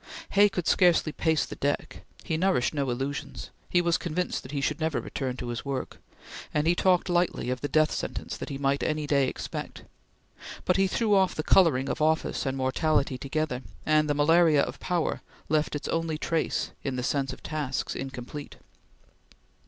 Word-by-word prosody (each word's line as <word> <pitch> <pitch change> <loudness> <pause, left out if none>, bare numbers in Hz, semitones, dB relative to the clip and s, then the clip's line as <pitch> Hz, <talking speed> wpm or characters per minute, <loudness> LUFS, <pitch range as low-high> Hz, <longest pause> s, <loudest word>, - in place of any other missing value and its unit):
Hay 205 +1 +6
could 180 -4 -3
scarcely 175 -3 +4
pace 160 0 +1
the - - -8
deck; 145 +1 -2 0.2
he 160 - -2
nourished 175 -6 +2
no 140 -3 -1
illusions; 135 +3 -4 0.2
he 175 - +3
was 170 -1 +1
convinced 175 +1 -2
that 130 - -10
he 145 - -2
should 150 +2 -1
never 160 -2 0
return 130 -2 -4
to 120 - -5
his 120 - -4
work, 140 -2 -4 0.5
and 150 0 0
he 170 - +4
talked 180 0 +2
lightly 175 -8 +1
of 130 - -3
the 145 - -1
death 155 +1 +3
sentence - - -4
that - - -6
he 140 - -4
might 140 0 +1
any 155 -1 -1
day 140 -2 +2
expect, - - -6 0.8
but 180 - +3
he 195 0 +4
threw 215 +2 +1
off 190 -2 +3
the 155 - -2
coloring 150 -9 +4
of - - -3
office 160 -2 +1
and 135 0 -1
mortality 135 0 +1
together, 140 -2 -2 0.2
and 155 0 +3
the 145 - +2
malaria 155 0 +5
of - - -5
power 175 -3 -1 0.3
left 155 -1 +1
its 145 - -4
only 165 -1 -1
trace 165 +1 -1
in 135 -2 -2
the 125 - -2
sense 135 0 0
of - - -11
tasks 150 -4 -2
incomplete. 135 +2 -6
150 Hz, 185 wpm, -27 LUFS, 135-165 Hz, 0.8 s, Hay